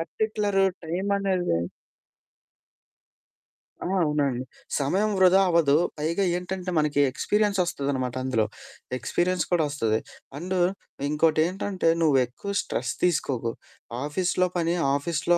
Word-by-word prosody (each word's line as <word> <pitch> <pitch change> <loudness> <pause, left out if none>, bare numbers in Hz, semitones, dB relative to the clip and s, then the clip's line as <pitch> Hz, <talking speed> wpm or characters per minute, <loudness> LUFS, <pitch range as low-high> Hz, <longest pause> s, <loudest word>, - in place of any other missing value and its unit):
Particular 205 +3 0 0.2
టైమనేది" 185 - 0 2.2
ఆ! - - -4 0.2
అవునండి. 140 -5 0 0.4
సమయం 190 +10 +1
వృధా 190 +1 +6
అవ్వదు. 165 -5 +4 0.2
పైగా 165 +6 0
ఏంటంటే 180 0 -4
మనకి 150 -1 +1
ఎక్స్‌పీరియన్స్ 205 +6 +1
వస్తదనమాట 135 -7 -2
అందులో. 115 -5 +1 0.5
ఎక్స్‌పీరియన్స్ 175 +8 0
కూడా 170 -2 +3
వస్తది. 115 -7 0 0.4
అండు 185 +2 -2 0.5
ఇంకోటేంటంటే, 165 +4 +1
"నువ్వు 150 -4 +4
ఎక్కువ 200 - -7
స్ట్రెస్ - - -3
తీసుకోకు, 135 -9 +1 0.5
ఆఫీస్‌లో 180 +4 +1
పని 170 0 +1 0.2
ఆఫీస్‌లో 165 +3 +1
170 Hz, 100 wpm, -26 LUFS, 145-185 Hz, 2.2 s, వృధా